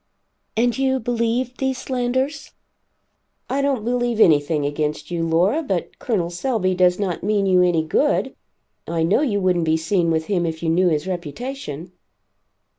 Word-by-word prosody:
"And 240 +1 +2
you 265 -1 +1
believed 240 +2 -1
these 265 -1 -1
slanders?" 260 +4 -2 1.0
"I 275 - +1
don't 270 -6 0
believe 240 -1 0
anything 150 -4 +4
against 150 +2 -3
you, 170 -1 -1
Laura, 175 - +2
but 195 - -3
Col. 180 -8 -1
Selby 185 -1 0
does 180 0 +3
not 190 -5 -2
mean 205 0 +1
you 185 -1 +4
any 175 -3 +2
good. 265 - +1 0.5
I 165 -1 -1
know 185 - +3
you 225 -9 +1
wouldn't 180 -3 +1
be 160 0 +2
seen 170 +1 0
with 160 -1 0
him 185 -2 0
if 160 0 -5
you 165 - 0
knew 180 +3 +3
his 150 -2 -1
reputation." 180 - -6
185 Hz, 160 wpm, -21 LUFS, 165-245 Hz, 1.0 s, anything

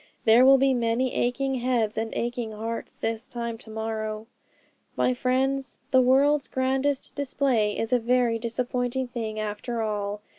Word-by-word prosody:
There 225 +3 +7
will 270 0 +8
be 270 0 +3
many 240 +1 0
aching 270 +3 0
heads 235 -4 0
and 225 0 -2
aching 240 -2 -3
hearts 225 +2 -5
this 225 +1 -3
time 235 -2 -4
to 225 - -13
morrow. 220 0 -4 0.7
'My 255 - +2
friends, 260 +1 -1
the 260 - +6
world's 275 +3 +3
grandest 265 +1 -1
display 260 -6 0
is 225 +2 -2
a 250 - +4
very 240 -1 +2
disappointing 245 +2 -2
thing 220 -3 -4
after 215 +2 -3
all. 205 -1 -3
240 Hz, 150 wpm, -26 LUFS, 225-260 Hz, 0.7 s, will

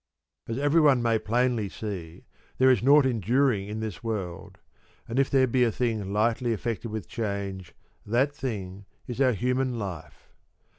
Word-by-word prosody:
As 115 - -3
everyone 145 -3 +4
may 115 -1 +2
plainly 120 -2 0
see 90 -7 -7 0.3
there 130 0 +6
is 125 - +2
nought 140 +3 +6
en 125 -4 0
during 115 -1 +1
in 105 +1 -5
this 110 -2 -5
world; 100 -7 -5 0.5
and 115 +4 -1
if 135 - +2
there 135 -1 +4
be 125 0 +2
a 115 - +2
thing 110 -5 -2
lightly 115 +3 +1
affected 115 +1 -3
with 110 0 -5
change, 100 -4 -4 0.3
that 125 +7 +1
thing 100 -8 -5 0.2
is 125 +2 -4
our 130 -2 +4
human 125 +2 0
life. 95 -8 -7
115 Hz, 160 wpm, -27 LUFS, 100-130 Hz, 0.5 s, there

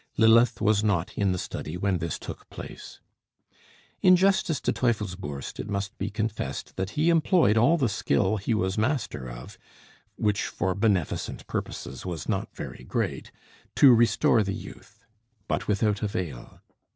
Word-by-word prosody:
Lilith 115 +2 +5
was 105 -1 +2
not 95 -5 0
in 100 -2 +1
the 90 - -1
study 85 -1 -5
when 95 -1 0
this 85 0 -3
took - - -9
place. - - -10 1.0
In 185 0 +7
justice 190 -4 +2
to - - 0
Teufelsbürst, 95 - -2
it 100 - -5
must 100 -1 -3
be 100 - -2
confessed 105 -11 -4
that 95 +1 -3
he 160 +3 +4
employed 165 - +4
all 120 +10 +4
the 135 -6 +2
skill 95 0 +1
he 105 +3 -1
was 95 0 0
master 115 - -1
of, - - -10 0.6
which 105 -1 0
for 95 +1 -1
beneficent 100 - -1
purposes 65 - -5
was 85 -4 -5
not 100 -3 -1
very - - -7
great, - - -3 0.4
to 135 -3 +8
restore 115 0 +4
the 100 -1 -2
youth; 110 0 -12 0.4
but - - -2
without 105 -1 +1
avail. 90 - -5
105 Hz, 150 wpm, -26 LUFS, 95-115 Hz, 1.0 s, to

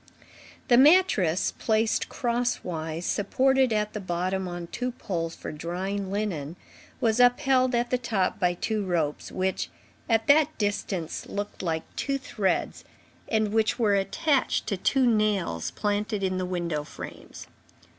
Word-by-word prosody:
The 240 - +5
mattress, 265 - +4
placed 220 0 +1
cross 240 -1 -1
wise, 160 -1 -4
supported 260 +5 +2
at 210 -1 0
the 210 - -3
bottom 185 0 -2
on 175 -1 -5
two 250 +8 -4
poles 170 -8 -4
for - - -7
drying 185 +5 -3
linen, 175 -7 -3 0.4
was 225 0 +1
upheld 255 0 +4
at 240 0 0
the 250 - +2
top 215 -6 -1
by 180 -1 +2
two 215 +3 -1
ropes, 165 -6 -1
which, 190 0 -1 0.4
at 225 -1 +3
that 300 +3 +4
distance, 200 -5 -2
looked 205 +1 -5
like 160 -3 -1
two 275 -1 -1
threads, 210 -7 -2 0.4
and 215 -2 0
which 220 +1 +2
were 220 -4 +2
attached 265 +9 +1
to 205 - -1
two 260 +7 +2
nails 210 - +1
planted 210 0 -2
in 185 -1 0
the 185 - -2
window 170 -4 -2
frames. - - -10
205 Hz, 145 wpm, -27 LUFS, 180-240 Hz, 0.4 s, The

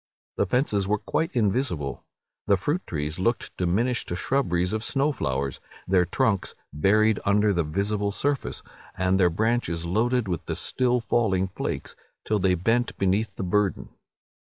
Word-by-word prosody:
The 100 - +1
fences 105 -4 +1
were 105 +1 +2
quite 160 +9 -1
invisible. 100 - 0 0.4
The 100 - +4
fruit 145 - -1
trees 75 +1 -3
looked 115 +6 -1
diminished 110 +8 0
to 85 - -3
shrubberies 90 -5 0
of 110 0 -2
snow 140 +4 +1
flowers, 70 - -2 0.3
their 90 -1 +4
trunks 110 -1 0 0.2
buried 105 +7 +3
under 105 +1 +3
the 85 -2 +1
visible 100 +6 -1
surface, 140 +6 -2 0.3
and 95 0 +2
their 90 -2 +5
branches 85 -3 0
loaded 115 +6 +1
with 90 -3 -3
the - - -2
still 125 -1 0
falling 95 -4 +1
flakes, - - -4 0.3
till 105 -1 +1
they 95 -1 +3
bent 115 +7 0
beneath 100 +2 0
the - - -4
burden. 100 +2 0
100 Hz, 150 wpm, -25 LUFS, 90-120 Hz, 0.4 s, their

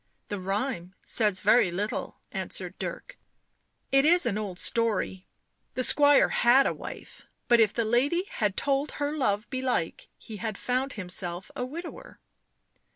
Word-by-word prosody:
" - - -47
The 205 - -3
rhyme 195 -1 -3
says 210 -4 +1
very 235 -6 +4
little," 200 +5 -4
answered - - -4
Dirk. - - -6 0.3
" - - -39 0.3
It 270 0 +5
is 345 +3 +5
an 225 - 0
old 205 -4 -4
story— 210 -4 0 0.5
the 255 - 0
squire 290 +2 +6
had 260 +3 +4
a - - +1
wife, - - -10 0.2
but 240 -1 +5
if 215 -3 +4
the 230 - -1
lady 270 +10 +2
had 205 -3 -1
told 280 +1 0
her 290 +1 -2
love 215 -7 0
belike 260 - -2
he 220 -3 -9
had 215 -1 -4
found 255 +2 -1
himself 180 -2 -3
a 250 - -2
widower." 340 - -9
235 Hz, 155 wpm, -27 LUFS, 205-275 Hz, 0.5 s, squire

